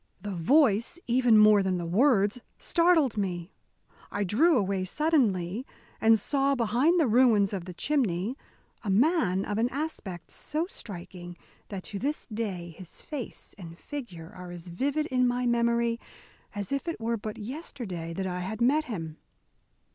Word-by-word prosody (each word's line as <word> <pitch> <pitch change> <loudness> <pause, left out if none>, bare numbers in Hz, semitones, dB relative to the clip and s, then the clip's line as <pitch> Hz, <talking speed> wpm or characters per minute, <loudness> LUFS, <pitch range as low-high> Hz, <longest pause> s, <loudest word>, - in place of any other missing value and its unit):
The 205 - -5
voice, 230 - +3
even 240 -2 +4
more 210 -1 +7
than 190 -1 0
the 175 - -3
words, 205 +3 +3 0.2
startled 335 - +3
me. 180 -3 -2 0.6
I 205 - -1
drew 265 - +4
away 195 -3 0
suddenly, 220 - +1 0.4
and 225 0 +6
saw, 275 +4 +1
behind 250 +9 +2
the 320 - +4
ruins 225 -4 +4
of 185 -3 -4
the 180 - -7
chimney, 230 - 0 0.5
a 210 - -3
man 200 - +2
of 210 +1 -2
an 235 +2 +2
aspect 250 - -5
so 310 +3 -2
striking 175 - -9 0.3
that 195 -3 -6
to 200 - -6
this 290 +6 -2
day 185 -6 -4
his 185 -3 -11
face 285 -6 -7
and 170 -2 -9
figure 185 - -8
are 180 -1 -9
as 175 0 -9
vivid 280 - -1
in 250 -4 +2
my 245 0 0
memory 235 -1 +1 0.6
as 205 +2 -4
if 275 +4 -2
it 335 - -3
were 230 +1 -1
but 215 -1 -6
yesterday 220 - -6
that 190 +3 -3
I 180 -1 -3
had 195 +5 -4
met 285 +6 +3
him. 165 - -5
220 Hz, 160 wpm, -28 LUFS, 185-265 Hz, 0.6 s, more